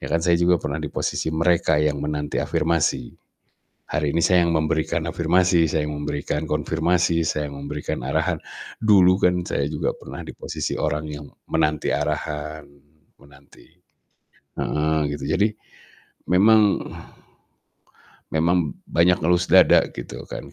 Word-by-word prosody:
ya, - - -6
kan 85 - +2
saya 85 0 +3
juga 85 +1 +3
pernah 70 0 -3
di 75 - -4
posisi - - -2
mereka 80 -2 +2
yang 75 -1 +1
menanti 75 0 -3
afirmasi. 80 -6 0 0.8
Hari 75 -1 -1
ini 85 - +1
saya 90 0 +4
yang 85 - +1
memberikan 80 0 0
afirmasi, 85 0 +2
saya 75 -1 -1
yang 75 - -4
memberikan 75 +1 -3
konfirmasi, 80 +2 0
saya 75 -1 -2
yang 70 - -9
memberikan 75 0 -4
arahan. - - 0 0.5
Dulu 95 -3 +6
kan 90 -2 +2
saya 70 - -1
juga - - -2
pernah - - -9
di - - -9
posisi - - -4
orang 75 0 -2
yang 75 -1 -7 0.2
menanti 75 -2 0
arahan, 75 0 -3 0.5
menanti 70 0 -19 0.9
heeh, 80 +1 0 0.2
gitu. 70 - -6
Jadi 105 - +3 0.9
memang 105 +2 +5 1.5
memang 85 -1 +1
banyak 90 +2 +3
ngelus 90 +1 +2
dada, - - +6
gitu - - -7
kan. - - -7
80 Hz, 135 wpm, -22 LUFS, 75-85 Hz, 1.5 s, Dulu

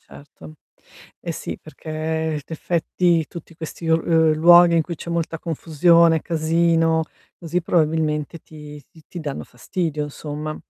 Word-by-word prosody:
Certo. 150 +2 -15 0.6
Eh - - -4
sì - - -6
perché, 155 +1 -14 0.5
in - - -8
effetti, 170 0 0
tutti 170 0 -11
questi 165 0 -7
o 160 - +5
uhm, 160 -1 +2
luoghi 170 +2 +6
in 165 - +3
cui 170 +2 -6
c'è 170 - -8
molta 165 -1 -2
confusione, 165 0 +3
casino, 165 0 +1 0.4
così, 175 +1 -2
probabilmente 155 -2 0
ti 150 -1 -12 0.3
ti 175 - -8
danno 145 -3 -5
fastidio, 150 +3 -4
insomma. 150 +1 -6
160 Hz, 135 wpm, -21 LUFS, 155-170 Hz, 0.6 s, luoghi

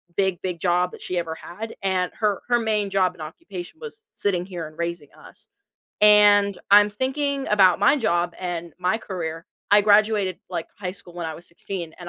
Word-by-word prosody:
big, 190 -3 0
big 180 -3 -4
job 180 0 +1
that - - -12
she 180 - -3
ever 165 -1 -4
had, 220 +8 -8
and 185 -2 0
her 210 -3 0
her 240 -1 +3
main 210 -3 0
job 185 -2 +1
and 165 - -14
occupation 180 - -9
was 445 -1 -10
sitting 180 -3 -1
here 175 -4 -6
and 155 - -16
raising 170 -4 -4
us, - - -17 0.5
and 205 -1 +6
I'm 205 0 +7
thinking 275 +4 -2
about 190 -4 +5
my 210 +9 +5
job 175 -7 0
and 175 -2 -5
my 185 +5 0
career 165 -5 -6 0.2
I 205 0 +7
graduated, 205 -3 +3
like, 165 - -4
high 185 -2 -4
school 175 -2 -15
when 175 -2 -4
I 160 - -5
was 170 - -13
16, 170 -1 -7
and 175 - -8
185 Hz, 195 wpm, -23 LUFS, 175-210 Hz, 0.5 s, I'm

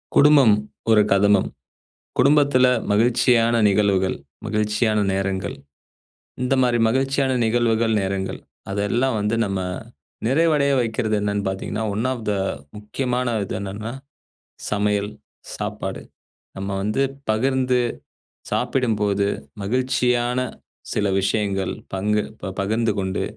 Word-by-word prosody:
குடும்பம் 140 -7 +6 0.4
ஒரு 110 -1 +6
கதம்பம். 100 0 +4 0.7
குடும்பத்தில 140 -2 +4 0.2
மகிழ்ச்சியான 115 +1 +3
நிகழ்வுகள், 100 -2 +2 0.3
மகிழ்ச்சியான 105 +1 +1
நேரங்கள். 95 -1 -2 0.9
இந்த 125 +1 +1
மாரி 120 -1 +2
மகிழ்ச்சியான 135 +3 +1
நிகழ்வுகள், 115 0 +2
நேரங்கள், 95 -1 -2 0.3
அதெல்லாம் 110 +5 0
வந்து 105 +2 0
நம்ம 100 -2 -2 0.7
நிறைவடைய 145 0 +3
வைக்கிறது 110 -2 0
என்னனு 100 0 -1
பார்த்தீங்கன்னா 95 +3 -3
ஒன் 110 +5 -1
ஆஃப் 120 -4 -6
த - - +1 0.4
முக்கியமான 125 +3 -2
இது - - -4
என்னன்னா 100 +3 -5 0.8
சமையல், 105 0 0 0.4
சாப்பாடு. - - -4 0.6
நம்ம 95 +1 -4
வந்து 105 +6 0 0.3
பகிர்ந்து 130 +2 +1 0.7
சாப்பிடும்போது 105 -5 +1 0.4
மகிழ்ச்சியான 125 +1 +1 0.6
சில 105 - +1
விஷயங்கள் 100 -1 0 0.2
பங்கு 105 +2 +1 0.2
ப 95 - -5
பகிர்ந்து 110 +2 0
கொண்டு 95 -1 -2
110 Hz, 100 wpm, -22 LUFS, 100-125 Hz, 0.9 s, குடும்பம்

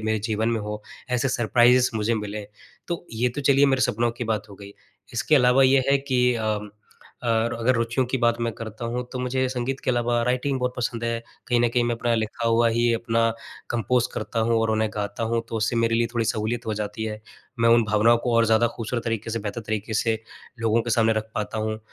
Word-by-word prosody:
मेरे 110 0 +1
जीवन 110 +1 -1
में 115 -2 0
हों, 105 0 -4 0.4
ऐसे 125 +2 +1
सरप्राइज़ 125 +1 +4
मुझे 110 +1 +1
मिलें, 105 -1 -4 0.4
तो 170 0 -3
ये 120 +3 +1
तो 125 +4 -5
चलिए 140 0 +4
मेरे 135 -1 +2
सपनों 120 -2 +1
की 120 - -3
बात 110 -1 -2
हो 100 - -10
गई। 100 0 -12 0.4
इसके 155 - +1
अलावा 125 +1 +5
ये 130 0 +5
है 140 - +4
कि 125 -2 +1
अ, 110 -2 -1 0.7
और 115 0 +1
अगर 115 +2 +1
रुचियों 115 +3 0
की 130 - 0
बात 120 -1 +2
मैं 115 - -1
करता 110 +1 -7
हूँ, 120 +2 -2
तो 130 - -4
मुझे 130 +1 0
संगीत 130 +1 -3
के - - +2
अलावा 120 -1 +1
राइटिंग 130 +2 0
बहुत 125 0 0
पसंद 120 -1 -2
है, 115 0 -1 0.3
कहीं 120 -1 +3
न 120 - +3
कहीं 120 +1 +1
मैं 120 0 0
अपना 120 0 0
लिखा 110 +1 -2
हुआ 115 0 +4
ही 120 +1 +2
अपना 115 0 +1 0.4
कंपोज़ 120 +1 +1
करता 115 - -2
हूँ 115 0 +2
और 115 - +1
उन्हें 110 0 +1
गाता 105 +1 -3
हूँ, 115 0 0
तो 115 - -3
उससे 110 +2 0
मेरे 115 0 +2
लिए 115 0 +2
थोड़ी 115 -1 +1
सहूलियत 115 +2 -2
हो 110 - -1
जाती 105 +1 -4
है। 110 -1 -5 0.4
मैं 115 - +4
उन 115 0 +6
भावनाओं 110 +3 +4
को 120 0 -1
और 115 - +5
ज़्यादा 110 +1 +4
खूबसूरत 120 +1 -3
तरीक़े 115 -1 -2
से, 115 - -1
बेहतर 105 +3 -4
तरीक़े 110 0 -3
से, 110 0 0 0.4
लोगों 115 0 +2
के 120 - -4
सामने 115 -1 +3
रख 110 0 -3
पाता 105 +1 -3
हूँ। 110 0 -2
115 Hz, 230 wpm, -24 LUFS, 110-125 Hz, 0.7 s, उन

